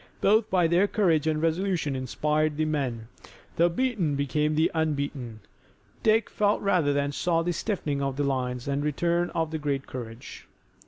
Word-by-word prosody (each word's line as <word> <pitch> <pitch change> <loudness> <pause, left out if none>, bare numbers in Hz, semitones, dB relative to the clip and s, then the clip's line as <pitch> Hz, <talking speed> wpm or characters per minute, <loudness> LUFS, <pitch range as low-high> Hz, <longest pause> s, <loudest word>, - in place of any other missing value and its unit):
Both 215 +2 +3
by 180 -2 +3
their 175 +5 +3
courage 170 -8 +2
and 155 -1 +1
resolution 165 -2 0
inspired 150 +4 0
the 155 - +1
men. 130 -7 -2 0.5
The 170 +1 +4
beaten 190 - 0
became 150 +2 0
the 160 +2 +2
unbeaten. 140 -8 -2 0.6
Dick 220 0 +3
felt 205 0 +1
rather 180 -7 +2
than 140 0 0
saw 165 +2 0
the 175 +1 -1
stiffening 160 -7 -2
of 135 -1 -2
the 145 - 0
lines, 125 -2 -2
and 140 0 0
the 150 - -1
return 170 +4 0
of 160 -1 -1
a 160 - -2
great 140 -2 -2
courage. 115 -2 -9
155 Hz, 170 wpm, -27 LUFS, 140-175 Hz, 0.6 s, The